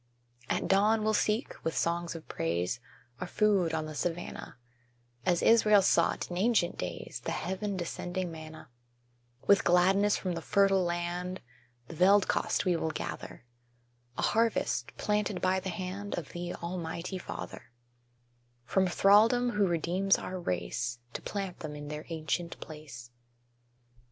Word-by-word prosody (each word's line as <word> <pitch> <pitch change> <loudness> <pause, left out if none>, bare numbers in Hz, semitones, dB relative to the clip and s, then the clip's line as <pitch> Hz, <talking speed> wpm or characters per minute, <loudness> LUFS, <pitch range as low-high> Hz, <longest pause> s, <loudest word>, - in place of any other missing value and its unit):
At - - 0
dawn 210 +3 +4
we'll 215 0 +2
seek, 215 +3 +1
with 160 - -2
songs 170 0 0
of 160 - -9
praise, 85 +7 -1 0.4
Our 180 - -4
food 195 -3 +2
on 160 -1 -1
the 155 - -6
savannah, 170 -3 -4 0.7
As 175 -2 +3
Israel 215 -3 +6
sought, 185 - +2
in 175 - -3
ancient 210 -5 +2
days, - - -5
The - - -2
heaven 190 +2 -2
descending 175 +1 -3
manna; 160 -4 -10 0.7
With 200 0 +5
gladness 190 +4 +4
from 185 - -3
the 165 - -4
fertile 195 +1 +3
land 175 +1 -2 0.5
The - - -8
veld 190 +4 +5
kost - - 0
we 180 -2 +3
will 160 -1 -1
gather, 155 - -6 0.7
A - - -1
harvest 230 +1 +1
planted 210 -2 0
by 185 +1 +2
the 190 0 -5
hand 185 +2 -4
Of 165 -5 -5
the 175 0 -5
Almighty 170 +1 -4
Father - - -7 1.0
From 190 +7 +2
thraldom 220 +7 +5
who 210 -3 +2
redeems 175 +3 +2
our 185 0 -5
race, 120 - -2 0.2
To - - -5
plant 195 -3 -4
them 150 -2 -6
in 145 0 -7
their 150 +1 -6
ancient 165 +1 -3
place. 140 -6 -10
180 Hz, 145 wpm, -30 LUFS, 165-200 Hz, 1.0 s, Israel